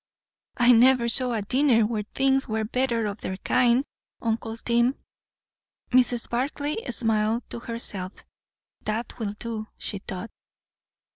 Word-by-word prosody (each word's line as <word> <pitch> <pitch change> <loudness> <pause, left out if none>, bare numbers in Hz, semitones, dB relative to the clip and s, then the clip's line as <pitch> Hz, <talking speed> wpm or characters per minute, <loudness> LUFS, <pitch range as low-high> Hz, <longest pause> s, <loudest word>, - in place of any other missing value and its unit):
"I 245 0 +6
never 245 0 +6
saw 250 +1 +2
a 215 -3 -1
dinner 250 0 +3
where 215 -1 -1
things 270 0 +2
were 220 -1 -1
better 235 0 0
of 205 0 -4
their 190 - -4
kind, 250 +4 +3 0.3
uncle 225 0 -2
Tim." 235 +3 +2 1.0
Mrs. 245 -1 +3
Barclay 285 +4 -1
smiled 225 0 0
to - - -5
herself. 205 -5 -5 0.7
That 225 +3 -3
will 205 -3 -2
do, 225 -2 -5
she 200 - -4
thought. 190 +3 -7
235 Hz, 130 wpm, -26 LUFS, 220-250 Hz, 1.0 s, I